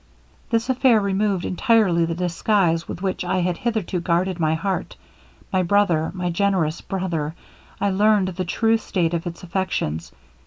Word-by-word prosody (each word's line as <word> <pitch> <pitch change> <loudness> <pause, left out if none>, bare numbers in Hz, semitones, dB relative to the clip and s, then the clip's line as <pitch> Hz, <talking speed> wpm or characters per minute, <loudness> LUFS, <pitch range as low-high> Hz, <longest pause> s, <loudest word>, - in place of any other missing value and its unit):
'This 230 -2 +1
affair 260 -3 +4
removed 200 -2 0
entirely 190 -5 +3
the 165 0 -3
disguise 175 -1 +1
with 180 - -6
which 190 -2 -1
I 180 +1 0
had 175 -1 0
hitherto 220 -6 -2
guarded 175 +1 0
my 160 -1 +2
heart; 185 +1 -3 0.6
my 185 - +3
brother 175 -4 +2
my 180 -1 -2
generous 170 -4 0
brother! 170 -5 -3 0.4
learned 200 0 +3
the 185 0 -3
true 225 +6 +2
state 175 -6 -1
of 170 +1 -2
its 170 +2 -7
affections. 170 - -2
185 Hz, 150 wpm, -22 LUFS, 170-200 Hz, 0.6 s, affair